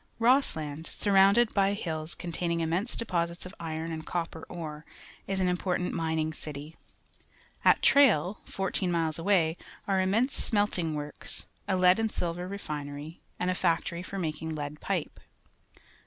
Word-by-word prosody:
Rosslnnd, 165 - +2
surrounded 200 +3 +4
b}' 200 0 +3
hills 160 -5 -4
containing 170 -1 -1
immense 175 +8 0
deposits 170 -6 0
of 185 - -8
iron 165 0 -4
and 160 -1 -4
copper 165 -2 -3
ore, 155 -3 -6 0.4
is 195 0 -1
an 185 - +2
important 180 0 0
mining 160 -1 0
city. 150 +1 -7 0.9
At - - +5
Tj 280 0 +8
nil, 185 - 0
fmir 195 -1 -2
teen 180 -2 0
miles 165 -2 0
away, 170 -3 +2 0.3
are 195 -1 +2
immense 220 +8 +2
smelting 195 -7 0
works, 150 0 -6 0.2
a 195 - +2
lead 180 +2 +5
and 220 -1 0
silver 175 +1 -2
refinery, 150 -4 -6 0.2
and 180 0 +1
a - - +1
factory 170 -1 0
for 195 +2 -6
making 160 -2 -3
lead 150 0 -5
pipe. - - -2
170 Hz, 150 wpm, -29 LUFS, 160-195 Hz, 0.9 s, Tj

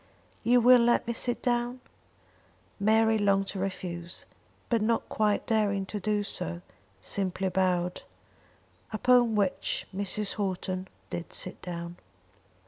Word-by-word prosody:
"You 245 +1 +5
will 250 +1 +8
let 240 0 +3
me 235 - -1
sit 240 +1 -1
down?" 240 +1 0 1.0
Mary 220 +1 +4
longed 195 -1 +2
to 195 - -3
refuse; 180 -2 -5 0.4
but, 230 -2 +1
not 225 +1 +1
quite 210 -1 +1
daring 205 -4 +1
to 210 +2 -5
do 210 +1 0
so, 85 - -4 0.4
simply 190 - -1
bowed, 180 -1 0 0.9
upon 240 +1 +4
which 200 -3 0
Mrs. 200 +1 -1
Houghton 185 -1 -2 0.2
did 175 - -5
sit 185 - -4
down. 170 -1 -6
200 Hz, 125 wpm, -29 LUFS, 185-225 Hz, 1.0 s, will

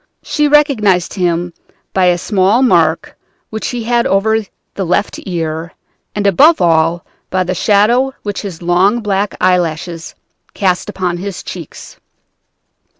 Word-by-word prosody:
She 300 -1 0
recognized 240 - +2
him 175 -2 -1 0.4
by 190 -1 +2
a 175 -1 +3
small 200 +6 +2
mark 255 - +2 0.4
which 220 0 -4
he 245 -2 -4
had 235 +1 +1
over 220 +3 +2 0.3
the 195 - -3
left 185 +3 -1
ear, 165 -2 -4 0.4
and 205 -1 -2
above 290 - +5
all 165 0 +2 0.2
by 185 0 0
the 185 +1 -2
shadow 225 +8 +2
which 205 -1 -4
his 180 -5 -8
long 190 +7 +2
black 200 -1 -1
eyelashes 170 -2 -1 0.4
cast 185 -2 0
upon 180 -2 -2
his 195 +1 -6
cheeks. 170 -5 -9
190 Hz, 135 wpm, -15 LUFS, 175-215 Hz, 0.4 s, above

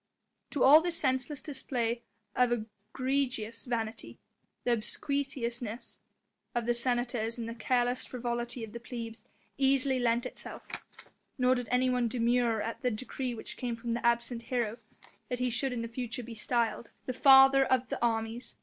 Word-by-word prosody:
To 285 - +1
all 295 +4 +9
this 345 0 +1
senseless 260 +1 0
display 245 -5 -1 0.3
of 250 -1 +3
egregious 230 +2 -2
vanity 225 -3 -3 0.5
the 245 - +3
obsequiousness 240 -1 -3 0.6
of 240 -1 0
the 240 - +2
senators 240 -1 0
and 230 -1 -4
the 230 - -4
careless 245 +1 +1
frivolity 240 -1 -3
of 220 -1 -8
the 235 - -5
plebs 230 -1 -7 0.3
easily 270 -1 +3
lent 235 -1 +2
itself; - - -8 0.7
nor 250 -1 +4
did 245 -2 -2
anyone 250 -1 +2
demur 235 -1 +2
at 230 - -4
the 250 - +2
decree 250 +2 -4
which 220 - -6
came 245 -3 -2
from 230 +1 -4
the 235 - -2
absent 235 0 +1
hero, 235 -2 -1 0.5
that 250 - -1
he 250 0 0
should 255 +3 +1
in 230 -2 -3
future 240 +1 -4
be 235 0 -8
styled: 230 0 -1 0.2
"The 255 - -2
Father 270 +1 +8
of 260 -1 +1
the - - -3
Armies! 225 +1 -1
240 Hz, 155 wpm, -31 LUFS, 230-255 Hz, 0.7 s, all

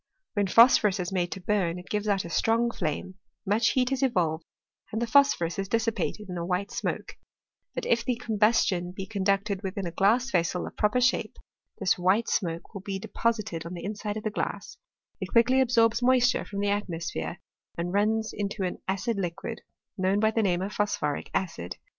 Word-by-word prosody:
When 205 -2 +1
phosphorus 210 -2 +6
is 180 +1 -3
made 180 -2 -1
to - - -8
burn 180 -3 0
it 180 - -10
gives 210 0 -1
out 195 -3 +1
a - - -6
strong 230 +4 +2
flame, 185 +2 -4 0.3
much 210 +3 +2
heat 255 0 +1
is 270 0 0
evolved, 170 -11 +1 0.5
and 220 - -2
the 235 - 0
phos 280 +5 +5
phorus 170 +2 -3
is 195 - -2
dissipated 225 -2 -1
in 180 -2 -5
a - - -2
white 180 +3 -2
smoke: - - -4 0.6
but - - -3
if 230 0 +2
the 245 +1 0
com 225 -3 -4
bustion 185 -5 +2
be 195 - -5
conducted 200 0 0
within 195 -1 -4
a 170 - -3
glass 230 +9 +2
vessel 175 +1 0
of - - -8
a - - -40
proper 210 +3 +2
shape, 250 +1 +1 0.4
this 190 -2 +1
white 190 +6 +2
smoke 170 -1 -2
will 200 - -6
be 195 0 -4
deposited 215 -4 -2
on 170 +2 -7
the 170 - -7
inside 210 +1 -4
of 215 - -6
the 215 - -1
glass; - - -4 0.4
it - - -4
quickly 255 +3 +4
absorbs 230 -2 +3
moisture 250 0 +3
from 200 -1 -4
the 205 - +1
atmo 200 -5 -1
sphere, 80 - -4 0.4
and 175 +2 -2
runs 220 +2 +1
into 205 -1 -3
an 180 - -3
acid 200 +4 -1
liquid, 195 +5 -4 0.4
known 190 +2 +2
by 220 +1 +3
the 225 - +1
name 185 -3 +1
of 200 - -4
phosphoric 150 -8 -1
acid. 160 - -3
200 Hz, 200 wpm, -27 LUFS, 180-225 Hz, 0.6 s, phosphorus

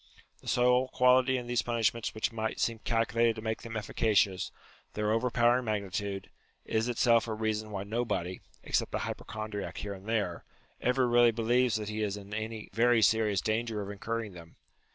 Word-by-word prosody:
The - - -15
sole 125 +1 +3
quality 130 +1 +4
in 125 - -5
these 120 0 +1
punishments 115 -1 -1
which 110 - -1
might 110 -1 -3
seem 115 -1 0
calculated 115 0 +1
to 110 - -7
make 110 0 -2
them 115 -1 -5
efficacious, 100 -3 +1 0.4
their 105 0 0
over 115 +3 +1
powering 120 +1 +3
magnitude, 100 -2 -3 0.3
is 110 +1 0
itself 115 -1 +3
a 110 - -2
reason 110 0 -2
why 100 -2 -4
nobody 100 -5 -2 0.2
(except - - 0
a - - -2
hypochondriac 110 -2 -5
here 100 -1 -4
and 100 +2 -10
there) 100 -7 -1 0.4
ever 125 0 +2
really 120 0 +5
believes 120 +2 +2
that 105 -1 -3
he 110 0 -3
is 105 -1 -1
in 100 0 -10
any 110 0 -5
very 115 +1 +4
serious 105 -3 +3
danger 110 0 -1
of 100 0 -4
incurring 110 +1 -4
them. 85 -2 -13
110 Hz, 175 wpm, -30 LUFS, 105-120 Hz, 0.4 s, really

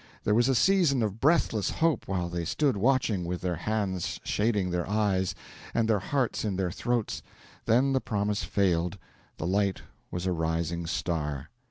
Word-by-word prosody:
There 105 - +2
was 120 +4 +4
a 135 - +3
season 170 -6 +4
of 105 0 -2
breathless 135 - +2
hope 165 -2 +1
while 90 -2 -1
they 85 0 -3
stood 120 - +1
watching, 110 -3 +2
with 90 +1 -3
their 90 -2 -1
hands 95 -2 -2
shading 105 -4 +1
their 90 +1 -2
eyes, 100 -3 +1 0.4
and 115 -1 +2
their 110 -2 +3
hearts 130 +5 -1
in 105 -3 -1
their 90 -2 -1
throats; 120 +3 -1 0.4
then 130 +4 +3
the 130 - +2
promise 105 -1 -1
failed: 90 -2 +1 0.4
the - - -4
light 100 +1 +1 0.3
was 90 +1 -4
a 95 - +1
rising 80 0 -1
star. 75 -3 -2
100 Hz, 170 wpm, -28 LUFS, 90-115 Hz, 0.4 s, was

